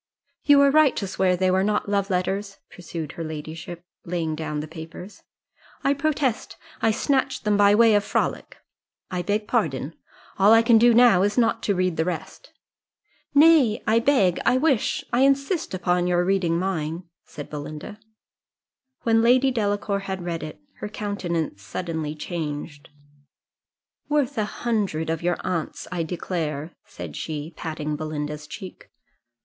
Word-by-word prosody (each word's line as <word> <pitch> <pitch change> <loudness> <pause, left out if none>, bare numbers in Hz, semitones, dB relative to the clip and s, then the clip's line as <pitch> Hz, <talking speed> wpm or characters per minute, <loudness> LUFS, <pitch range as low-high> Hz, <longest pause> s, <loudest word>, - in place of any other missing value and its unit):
"You 290 -1 +7
were 280 0 +6
right 305 -2 +5
to 200 - -2
swear 185 -1 +1
they 185 0 +2
were 190 +1 +2
not 210 +1 0
love 200 0 0
letters," 195 +2 -2
pursued 165 -4 -7
her 165 - -6
ladyship, 160 +2 -7 0.2
laying 170 -2 -2
down 155 -1 -4
the 150 - -5
papers. 160 +5 -10 0.6
"I 275 - +3
protest 280 -4 -1 0.2
I 225 - +3
snatched 265 +4 0
them 210 -1 +2
by 205 0 +5
way 225 0 +6
of 205 -1 +3
frolic - - -2 0.5
I 180 -1 -1
beg 210 +3 -1
pardon. 160 - -1 0.5
All 200 +3 +7
I 225 0 +6
can 230 -1 +5
do 240 0 +5
now 235 -6 +6
is 205 +3 +1
not 230 -2 +2
to 200 - 0
read 185 -2 0
the 160 - +2
rest." 170 -3 -6 0.8
"Nay 285 -7 +5
I 225 +1 +3
beg 230 -9 +3
I 255 - +3
wish 270 -4 +1
I 240 - +3
insist 275 +6 +2
upon 180 -1 +1
your 175 0 +2
reading 180 -3 +1
mine," 170 -2 -2 0.2
said 145 - -9
Belinda. 155 +7 -7 1.0
When 225 -1 +3
Lady 255 +3 +4
Delacour 205 -3 -1
had 190 -2 -5
read 170 -2 -3
it, 155 0 -8 0.2
her 210 - -5
countenance 175 - -3
suddenly 155 - -4
changed 150 -2 -5 1.2
"Worth 290 -2 +1
a 215 -3 0
hundred 200 -9 -2
of 165 - -3
your 175 0 0
aunt's, 170 -4 -3
I 180 -2 -2
declare," 160 -2 -3
said - - -9
she, 155 +1 -5
patting 155 -2 -4
Belinda's 150 -1 -5
cheek. 190 +1 -10
185 Hz, 155 wpm, -24 LUFS, 160-225 Hz, 1.2 s, You